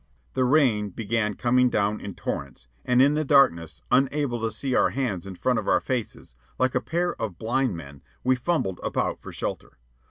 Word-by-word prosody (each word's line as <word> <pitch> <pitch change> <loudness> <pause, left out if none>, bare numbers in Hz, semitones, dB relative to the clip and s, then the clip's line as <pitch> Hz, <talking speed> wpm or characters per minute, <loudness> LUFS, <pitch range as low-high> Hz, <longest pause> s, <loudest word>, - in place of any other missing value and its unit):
The 130 - +1
rain 125 -7 +3
began 105 +1 -1
coming 125 +1 +3
down 105 -1 0
in 100 -2 -7
torrents, - - -5 0.2
and 125 +1 +4
in 140 +2 +4
the 155 +1 0
darkness, 85 - +3
unable 135 -2 +1
to 115 - 0
see 130 +5 -3
our - - +4
hands 110 -9 -3
in 95 - -7
front 125 +5 +1
of 105 - -6
our - - +4
faces, 120 - -4 0.2
like 130 -1 +1
a - - +1
pair 175 +1 -1
of 100 -6 -3
blind 120 -2 0
men 70 -3 -11 0.2
we 130 +1 +3
fumbled 125 - -1
about - - -1
for - - -9
shelter. - - -5
120 Hz, 190 wpm, -25 LUFS, 100-130 Hz, 0.2 s, and